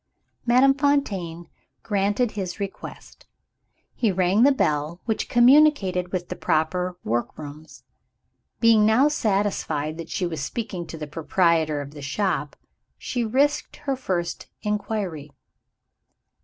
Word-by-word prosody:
Madame 255 +3 +5
Fontaine 205 - -1 0.4
granted 205 +3 0
his 190 -1 -5
request. 200 -1 -8 0.7
He 225 -4 +1
rang 185 +3 +2
the 280 +3 +7
bell 155 - 0
which 220 - -2
communicated 240 -9 +4
with 180 -2 -3
the 180 +3 -1
work 120 +2 -2
rooms. 150 +1 -10 0.8
Being 225 -2 +5
now 225 +7 +4
satisfied 195 - -1
that 165 - -7
she 180 - -2
was 160 -4 -4
speaking 185 +1 -4
to 160 - -8
the 155 - -5
proprietor 160 -1 +1
of 140 0 -8
the 145 -1 -10
shop, 150 +1 -2 0.4
she 245 -2 -3
risked 275 +6 +1
her 285 -2 -3
first 185 -9 -3 0.2
inquiry. 200 -8 -3
190 Hz, 120 wpm, -24 LUFS, 160-230 Hz, 0.8 s, the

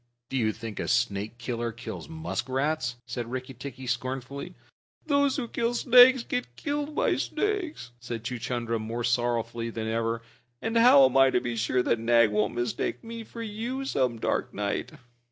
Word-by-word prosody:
"Do - - -4
you 110 -3 +2
think 115 -1 -7
a - - -2
snake 110 -2 0
killer 120 -1 -3
kills 115 +7 -8
muskrats?" 135 -3 -2
said 120 -1 -5
Rikki 130 +1 -5
tikki 130 +1 -8
scornfully. 130 +3 -4 0.5
"Those 285 -3 +3
who 250 -4 -2
kill 235 +1 -1
snakes 250 0 +7
get 250 +1 -3
killed 295 0 -3
by - - +2
snakes," 370 - -2
said 120 -2 -6
Chuchundra, 120 -1 -2
more 115 +2 -4
sorrowfully 120 -1 0
than 110 -1 -4
ever. 115 0 -1 0.4
"And 225 +1 -3
how 230 - +8
am 130 0 +1
I 135 0 +7
to 125 - +2
be 120 -1 -3
sure 125 +2 +1
that 115 - +1
Nag 115 -1 +4
won't 105 +1 0
mistake 120 0 -2
me 230 0 -7
for 230 +1 -8
you 235 +5 -4
some 130 - 0
dark - - -1
night?" 100 0 -2
125 Hz, 170 wpm, -27 LUFS, -, 0.5 s, how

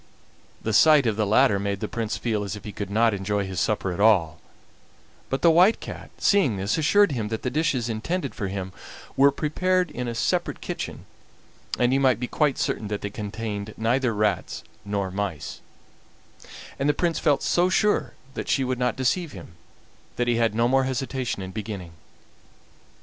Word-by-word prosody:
The 110 - -1
sight 150 +3 +6
of 110 -3 +1
the 105 -1 0
latter 110 -1 +4
made 100 0 -2
the 105 - -3
Prince 115 -1 -3
feel 110 -3 -1
as 100 0 -4
if 105 - -10
he 105 - -6
could 100 -1 -5
not 110 +2 +3
enjoy 100 +1 -1
his 95 -2 -4
supper 100 -3 0
at 85 - -7
all; 90 -7 +3 0.9
but 135 - -2
the 170 - +7
White 180 +7 +5
Cat, - - -8
seeing 160 - +3
this, 100 +2 0
assured 185 +4 +4
him 115 -6 -2
that 110 0 -4
the 125 - -1
dishes 135 -5 0
intended 140 +7 -3
for 100 - -3
him 95 0 -5 0.4
were 140 +1 +6
prepared 180 +5 0
in 125 0 -4
a 120 - -3
separate - - 0
kitchen, - - -6 0.7
and 125 +1 +2
he 135 - +3
might 130 -5 +3
be 125 - -2
quite 145 +2 +1
certain 110 - -1
that 105 0 -3
they 100 - -4
contained 105 0 -5
neither 120 +3 +1
rats 105 -3 -1 0.2
nor 100 -2 -2
mice; 95 -6 -4 1.2
and 140 +2 +1
the 145 - +2
Prince 170 0 0
felt 145 -4 +2
so 175 +1 +2
sure 210 +2 +1 0.2
that - - -5
she 135 - +2
would 130 -1 -2
not 125 0 +1
deceive 145 +6 0
him 95 -4 -10 0.7
that 120 - -1
he 120 -1 +2
had 115 -2 +1
no 115 +1 +3
more 135 +1 +3
hesitation 130 -5 -3
in 95 - -7
beginning. 100 -4 -6
115 Hz, 190 wpm, -25 LUFS, 100-135 Hz, 1.2 s, the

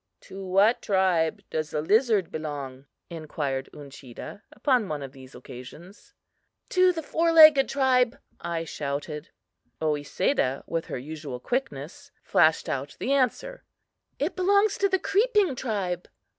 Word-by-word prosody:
"To 195 +1 -9
what 195 +5 +3
tribe 185 -5 +1
does 155 -1 -2
the 150 - -2
lizard 215 - +2
belong?" 140 -4 -6 0.2
inquired 145 -5 -4
Uncheedah, 140 - -10
upon 250 -8 +1
one 150 -2 -4
of 135 - -8
these 130 -1 -14
occasions. 155 - -12 0.5
"To 370 0 +4
the 325 -2 -5
four 330 +3 +1
legged 310 -4 +8
tribe," 260 -2 +2 0.2
I 170 -1 -3
shouted. 145 0 -5 0.5
Oesedah, 145 - 0
with 165 -1 -3
her - - -4
usual 145 -1 -7
quickness, 155 - -4
flashed 160 -1 +3
out 140 +1 -4
the 270 - -2
answer: 280 - -1 0.5
"It 295 +6 -2
belongs 400 +3 +2
to 395 - +2
the 380 - +2
creeping 410 - +2
tribe." 195 -8 -3
180 Hz, 130 wpm, -26 LUFS, -, 0.5 s, legged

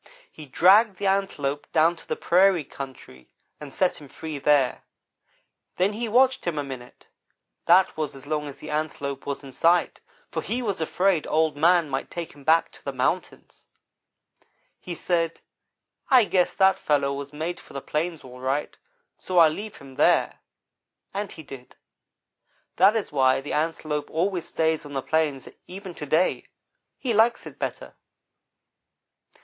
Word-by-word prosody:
"He 155 -2 -11
dragged 195 - +5
the 200 - -5
Antelope 170 -8 -1
down 165 +2 +3
to - - -12
the - - -1
prairie 185 -1 +3
country, 130 - -10 0.3
and 150 -2 -9
set 180 +1 0
him 145 - -11
free 155 +1 -7
there. 140 -3 +2 1.0
Then 190 +3 +2
he 230 +2 -3
watched 260 +3 +3
him 170 -3 -2
a 145 - -1
minute; 130 -3 -10 0.6
that 180 +2 +5
was 155 -3 -3
as 135 - -11
long 150 0 -2
as 140 - -9
the - - -8
Antelope 145 -3 -3
was 140 0 -4
in 135 - -10
sight, 170 +6 +2 0.3
for - - -2
he 245 +2 -3
was 200 -7 -2
afraid 180 +1 +1
Old 155 -1 +1
man 170 +2 +4
might 135 -1 -3
take 170 -1 -6
him 145 -1 -16
back 160 +3 +3
to - - -17
the 140 - -3
mountains. 130 -1 -3 1.1
"He 175 - -7
said: 165 0 -1 0.7
'I 250 -4 +6
guess 185 -3 +1
that 190 -1 +4
fellow 140 -2 +1
was 140 0 -6
made 160 +4 -4
for - - -16
the 140 - -4
plains, 160 +4 -3
all 125 -1 -12
right, 135 +3 -2 0.4
so 185 - -4
I'll 165 -2 +7
leave 210 +6 -7
him 135 -1 -14
there'; - - +3 0.7
and 200 0 -4
he 160 - -10
did. 135 -3 -12 1.0
That 195 +5 +6
is 220 -6 -2
why 130 -2 +3
the 135 - -6
Antelope 155 -1 -2
always 175 +1 -1
stays 160 -1 0
on 145 -1 -10
the 135 -1 -2
plains, 155 -4 0 0.2
even 190 0 -8
to 150 - -7
day. 160 +6 +1 0.5
He 245 -4 -2
likes 225 +2 +3
it - - -11
better. - - -5
160 Hz, 165 wpm, -25 LUFS, 140-185 Hz, 1.1 s, I'll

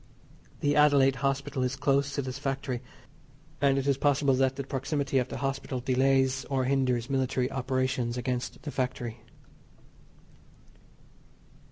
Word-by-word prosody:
The 145 0 +2
Adelaide 140 -3 +5
Hospital 135 0 -1
is 125 +1 -1
close 140 0 +1
to 140 - -1
this 130 +1 -5
factory, 135 -3 -3 0.8
and 140 -1 +4
it 135 - -1
is 140 -2 +2
possible 140 -1 +3
that 130 0 +2
the 140 - -4
proximity 135 +1 -1
of 125 - -1
the - - -5
hospital, 135 -1 -3
delays 130 +1 +2
or 135 -2 0
hinders 125 -3 +1
military 130 -1 0
operations 130 -2 -1
against 125 0 -3
the 150 - -5
factory. 125 -3 -3
135 Hz, 135 wpm, -28 LUFS, 130-140 Hz, 0.8 s, Adelaide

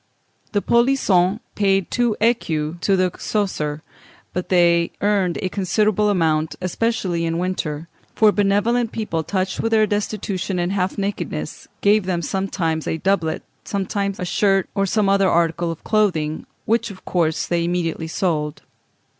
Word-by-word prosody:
The 205 - +1
polissons 225 -6 +3
paid 195 -2 +1
two 240 -3 +1
écus 170 -8 0
to 195 - +3
the 185 -1 +2
Coesre, 155 -8 -2 0.5
but 180 - -3
they 170 -2 +4
earned 200 -4 +1
a 185 - 0
considerable 210 +2 +1
amount, 160 -5 +1
especially 185 -2 -1
in 165 0 -1
winter; 170 -3 -3 0.3
for 215 -1 +5
benevolent 210 +4 +1
people, 210 -8 -2
touched 185 +3 -2
with 225 - 0
their 215 -1 +5
destitution 205 -2 -2
and 175 +1 0
half 190 -1 -1
nakedness, 200 0 -4
gave 205 -1 +3
them 175 -2 -1
sometimes 165 -3 -2
a - - -1
doublet, 170 -2 0 0.2
sometimes 200 0 -2
a 180 - -2
shirt, 195 +1 +2
or 195 -1 +1
some 210 +1 +1
other 195 -1 +4
article 170 0 +1
of 165 - -6
clothing, 165 -8 0 0.2
which 230 +1 +1
of 195 -2 -12
course 160 -3 0
they 170 -1 0
immediately 170 -2 -1
sold. 155 -3 -2
190 Hz, 145 wpm, -21 LUFS, 170-205 Hz, 0.5 s, for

